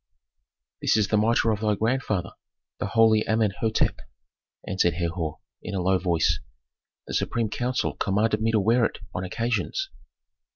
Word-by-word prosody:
"This - - +3
is 105 -2 +1
the 105 - +3
mitre 115 +1 +3
of 105 - -1
thy 105 -1 +1
grandfather, 110 -5 -1 0.5
the - - -1
holy 110 -1 +4
Amenhôtep," 110 0 +1 0.7
answered 90 -3 +1
Herhor, 85 -2 -2 0.2
in 105 - -5
a - - 0
low 95 +1 +2
voice. 85 -3 +1 0.7
"The - - -7
supreme 115 -3 0
council 125 +2 -1
commanded 105 +2 +1
me 110 - +2
to 110 -1 +3
wear 115 +4 +3
it - - 0 0.2
on 90 - -3
occasions." 120 - -2
110 Hz, 150 wpm, -25 LUFS, 95-115 Hz, 0.7 s, holy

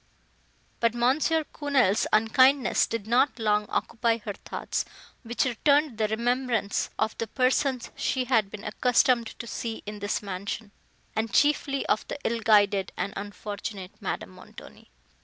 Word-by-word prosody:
But 230 0 +2
M. 250 +4 +2 0.3
Quesnel's 270 -9 +2
unkindness 255 +5 +4
did 230 -3 -4
not 245 +5 +2
long 210 -2 +1
occupy 230 0 0
her 210 -2 -6
thoughts, - - -4 0.4
which 240 +1 -1
returned 280 +1 +2
the 215 - +2
remembrance 235 -1 0
of 220 - 0
the 230 - -2
persons 255 +1 0
she 260 -1 -1
had 225 -6 +2
been 210 +1 -9
accustomed 240 +2 +2
to 235 - -6
see 230 -1 -5
in 210 0 -6
this 205 +1 -2
mansion, 200 +2 -5 0.4
and 220 0 -1
chiefly 290 -2 +2
of 215 - 0
the - - -4
ill 230 0 0
guided 205 -3 +3
and 200 - -2
unfortunate 205 -1 -6
Madame - - -4
Montoni. - - -14
230 Hz, 140 wpm, -27 LUFS, 210-255 Hz, 0.4 s, unkindness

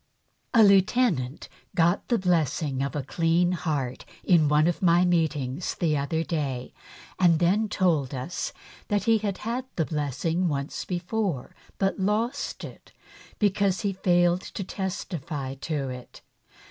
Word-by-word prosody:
A 225 - +8
LIEUTENANT 195 - +3 0.3
got 175 +1 +2
the 240 - +2
blessing 160 - 0
of 140 +2 -2
a 145 - -2
clean 165 +5 +2
heart 140 -6 -2 0.2
in 165 -5 +4
one 150 +1 +4
of 175 0 0
my 175 -1 +4
meetings 160 -4 0
the 160 -3 +1
other 150 +3 -1
day, 140 -7 -3 0.5
and 175 -3 +5
then 195 +6 +2
told 155 -10 +1
us 130 +8 -4 0.4
that 205 -1 0
he 225 -1 +3
had 200 -3 -2
had 245 +3 -2
the 165 - +1
blessing 155 +4 -1
once 140 -1 -3
before 180 - -2 0.2
but 195 +1 0
lost 220 +8 -1
it - - -11 0.4
because 200 -2 +1
he 200 -3 -1
failed 175 -1 +2
to 195 - -6
testify 170 -8 -4
to 135 0 -3
it. 125 -1 -10
170 Hz, 140 wpm, -26 LUFS, 145-190 Hz, 0.5 s, A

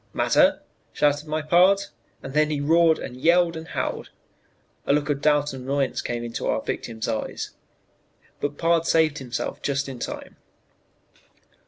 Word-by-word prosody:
"'Matter?' - - +3 0.3
shouted 145 +1 +1
my 155 0 -2
pard, 180 +5 +5 0.4
and 135 - -7
then 150 0 +3
he 150 -2 -1
roared 160 +2 +4
and 125 - -7
yelled 170 +4 +3
and 160 0 -7
howled. - - -3 0.8
"A - - +4
look 150 0 +1
of 140 -1 -2
doubt 145 -1 +2
and 130 -1 -7
annoyance 135 0 -1
came 120 -1 -4
into 115 -1 -4
our - - +1
victim's 110 -2 -4
eyes; 110 - -3 0.9
but 145 0 -3
pard 165 0 +2
saved 155 -2 +3
himself 125 -3 -4
just 140 0 -1
in 130 -3 -7
time. - - -6
145 Hz, 155 wpm, -24 LUFS, 135-160 Hz, 0.9 s, pard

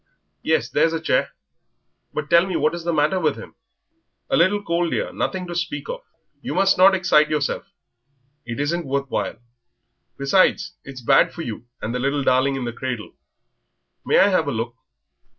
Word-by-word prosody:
"Yes, - - +1
there's 165 - +2
a 165 - -1
chair; 160 - +1 0.8
but 150 0 -4
tell 170 +3 +4
me 185 - -3
what 155 - +1
is 170 -1 -5
the 170 - +1
matter 155 +4 +2
with 155 -5 0
him?" - - -10 0.8
"A - - +4
little 205 +5 +3
cold, 170 -1 0
dear - - -2
nothing 185 -1 -2
to 175 - -6
speak 170 - -3
of. - - -5 0.4
You - - -4
must 195 - +4
not 190 +1 +6
excite 165 -5 +3
yourself, 150 +6 -2 0.7
it 120 +2 -6
isn't 160 +2 -1
worth 140 0 -2
while; - - -2 0.8
besides, 185 +5 +2
it's 135 -2 -9
bad 135 +3 +4
for 170 - -7
you 120 -1 -7 0.2
and 115 - -2
the 125 - -2
little 140 +2 0
darling 130 +1 +2
in 130 -2 -3
the 120 - -4
cradle. 125 -3 -5 0.9
May - - +2
I 200 - +6
have 185 -6 +1
a - - 0
look?... 115 0 -3
155 Hz, 185 wpm, -22 LUFS, 135-180 Hz, 0.9 s, not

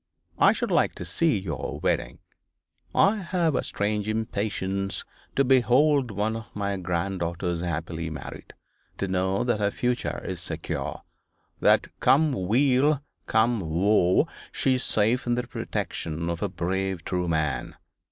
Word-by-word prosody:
I - - +7
should - - -2
like - - +2
to - - -6
see 165 -9 +1
your 80 -9 -4
wedding. - - -1 0.7
I 205 +3 +5
have 175 -4 0
a - - +1
strange 105 0 -1
impatience 100 -3 -2 0.3
to 140 - +4
behold 135 +1 +4
one 105 +2 -1
of 115 -1 -6
my 100 -1 -1
granddaughters 85 -1 -2
happily 85 -1 -3
married, 75 -3 -8 0.4
to 100 - -1
know 95 +2 0
that 120 -3 0
her 100 -1 +2
future 125 +3 -1
is 90 -2 -4
secure, - - -4 0.6
that - - +4
come 155 +2 +4 0.2
weal, 135 +5 +3 0.3
come 115 +1 +3
woe, 90 - +3 0.2
she 135 - +1
is 130 0 +1
safe 115 +4 +2
in 120 - +2
the 125 0 -2
protection 85 -7 -3
of 85 - -4
a - - 0
brave 95 0 -2
true 90 -1 -1
man. 80 -4 -1
100 Hz, 140 wpm, -26 LUFS, 90-125 Hz, 0.7 s, I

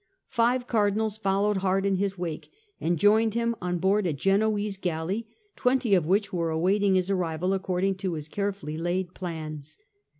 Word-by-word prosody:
Five 245 +1 +2
Cardinals 215 -2 +1
followed 200 0 +1
hard 190 +1 +1
in 195 -1 +2
his 195 0 -1
wake, 170 -3 -5 0.3
and 170 +1 0
joined 215 +4 +4
him 235 0 0
on 180 0 -1
board 190 +3 +2
a 165 - 0
Genoese 205 +4 +1
galley, 180 +5 -2 0.3
twenty 250 -4 +2
of 175 -5 +3
which 200 +3 +1
were 170 -2 0
awaiting 190 +5 +2
his 185 +1 +1
arrival 180 0 0
according 190 0 0
to 185 -2 -2
his 150 -1 -6
carefully 195 -5 -3
laid 175 +1 -2
plans. 155 -5 -6
195 Hz, 165 wpm, -27 LUFS, 175-205 Hz, 0.3 s, joined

